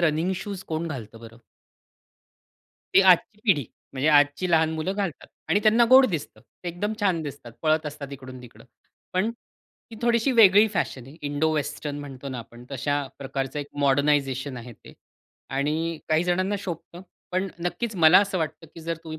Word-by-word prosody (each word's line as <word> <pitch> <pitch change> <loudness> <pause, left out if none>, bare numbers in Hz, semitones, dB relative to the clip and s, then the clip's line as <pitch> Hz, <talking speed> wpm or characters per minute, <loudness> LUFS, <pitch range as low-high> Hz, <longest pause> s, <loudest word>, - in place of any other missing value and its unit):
Running 165 +2 +1
shoes 200 -1 -6
कोण 160 +1 -3
घालतं 115 -6 -7
बरं. 115 0 -12 1.6
ती - - +8
आजची 190 +3 +4
पिढी 165 - +3 0.3
म्हणजे 135 +3 0
आजची 145 +4 +3
लहान 160 -1 +4
मुलं 160 +4 -2
घालतात 195 -6 -3 0.2
आणि 190 +6 +3
त्यांना 225 +2 +5
गोड 260 0 +9
दिसतं, 165 - -5
ते 180 - -10
एकदम 190 +5 -3
छान 190 -5 +2
दिसतात, 140 -5 -8
पळत 155 0 +2
असतात 145 -1 -7
इकडून-तिकडं, 130 -3 -11 0.5
पण 185 +5 +1
ती 230 -1 -18
थोडीशी 235 +2 +2
वेगळी 210 -2 +7
फॅशन 130 -8 -2
आहे, 140 - -13
इंडो-वेस्टर्न 145 0 -1
म्हणतो 140 -1 -8
ना 130 -2 -5
आपण 120 +1 -11
तशा 140 +1 -1
प्रकारचं 135 0 -4
एक 145 - -4
मॉडर्नायझेशन 140 -1 +1
आहे 120 0 -9
ते 105 - -16 0.7
आणि 160 +3 -1
काही 155 +2 +2
जणांना 185 +3 0
शोभतं, 175 -1 -7 0.3
पण 185 +2 0
नक्कीच 205 +5 -3
मला 165 0 +7
असं 200 -2 -1
वाटतं, 160 0 -4
की 165 - -10
जर 165 +1 -3
तुम्ही 160 -1 -7
160 Hz, 165 wpm, -25 LUFS, 140-185 Hz, 1.6 s, गोड